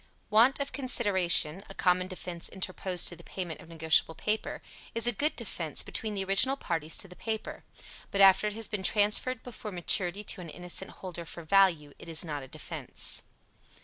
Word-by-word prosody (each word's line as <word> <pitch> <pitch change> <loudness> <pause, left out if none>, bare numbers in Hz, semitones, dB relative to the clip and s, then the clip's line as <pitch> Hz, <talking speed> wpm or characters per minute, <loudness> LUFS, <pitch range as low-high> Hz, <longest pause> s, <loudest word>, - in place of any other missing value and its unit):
Want 235 +7 +5
of 280 0 -3
consideration 195 - +3
a 195 - -10
common 180 0 +2
defense 180 -2 -5
interposed 185 -1 +3
to 175 - -6
the - - -15
payment 175 -4 -6
of - - -15
negotiable 160 0 +2
paper 215 +6 -3 0.3
is 230 0 +1
a 240 - +4
good 290 +8 -1
defense - - -2
between 215 -2 -4
the 195 - -2
original 195 +8 +2
parties 165 - -2
to 195 - -4
the 180 - -13
paper; 220 +1 -5 0.5
but 200 - -3
after 195 +1 +7
it 210 - -3
has 225 0 -5
been 210 -3 -4
transferred 210 +5 +1
before 230 -3 -8
maturity 180 +2 +1
to 190 - -3
an 170 - -9
innocent 180 +3 -5
holder 175 -2 -8
for 170 +1 -9
value 165 -5 +3
it - - -11
is 165 +1 -1
not 150 -3 -4
a 135 - -10
defense. - - -2
190 Hz, 185 wpm, -29 LUFS, 170-215 Hz, 0.5 s, after